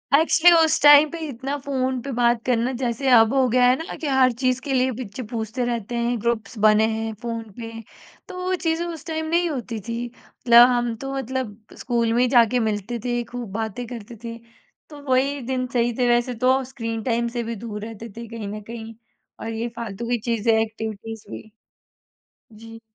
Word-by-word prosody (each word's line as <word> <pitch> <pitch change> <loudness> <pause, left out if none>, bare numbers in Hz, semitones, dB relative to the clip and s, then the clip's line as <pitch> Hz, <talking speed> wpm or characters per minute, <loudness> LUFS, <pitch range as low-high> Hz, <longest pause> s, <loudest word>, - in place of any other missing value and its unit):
Actually 330 +2 +6
उस 320 - +2
time 290 +1 +8
पे 335 - -6
इतना 270 +1 -4
फ़ोन 260 -2 -1
पे 275 - -6
बात 235 -1 +2
करना 245 0 +1
जैसे 245 +2 -1
अब 225 0 +6
हो 265 -1 +3
गया 250 +1 +4
है 250 - +4
ना 325 - -6
कि 310 - -4
हर 265 -2 +4
चीज़ 255 -1 +2
के 270 0 -3
लिए 260 0 +2
पिच 245 -2 -7
पूछते 230 +2 -3
रहते 235 -1 -3
हैं, 235 0 0
ग्रुप्स 230 -1 -2
बने 215 +1 +5
हैं 225 0 -3
फ़ोन 230 -1 -4 0.2
पे, 225 0 -6 0.6
तो 375 - -9
वो 370 0 0
चीज़ें 335 -1 -1
उस 330 -3 -7
टाइम 320 -1 -3
नहीं 345 +1 +2
होती 245 -6 -4
थी। 235 +1 -3
मतलब 240 0 +4
हम 240 -2 0
तो 270 +4 -6
मतलब 260 -5 -3 0.2
स्कूल 235 -2 0
में 240 - +3
ही 250 - +4
जाके 245 -1 +4
मिलते 220 +1 -2
थे, 240 -1 0
खूब 235 -3 -7
बातें 225 +2 -3
करते 235 -1 -8
थे, 230 0 -6 0.5
तो 295 -2 -11
वही 275 +3 +2
दिन 255 -1 -1
सही 240 -1 +1
थे 250 -2 +2
वैसे 240 +1 +2
तो 260 +1 +4
स्क्रीन 230 -3 -5
टाइम 235 0 0
से 235 - 0
भी 230 +1 -4
दूर 210 -1 -7
रहते 225 0 -8
थे 235 0 -7
कहीं 225 -2 -6
न 210 +1 -6
कहीं 225 -1 -8 0.5
और 225 - -5
ये 225 +2 -2
फालतू 230 -1 -5
की 245 - +2
चीज़ें 230 -1 +2
एक्टिविटीज़ 220 0 -5
भी 110 - -9 1.0
जी। 225 +1 -12
240 Hz, 200 wpm, -23 LUFS, 225-260 Hz, 1.0 s, टाइम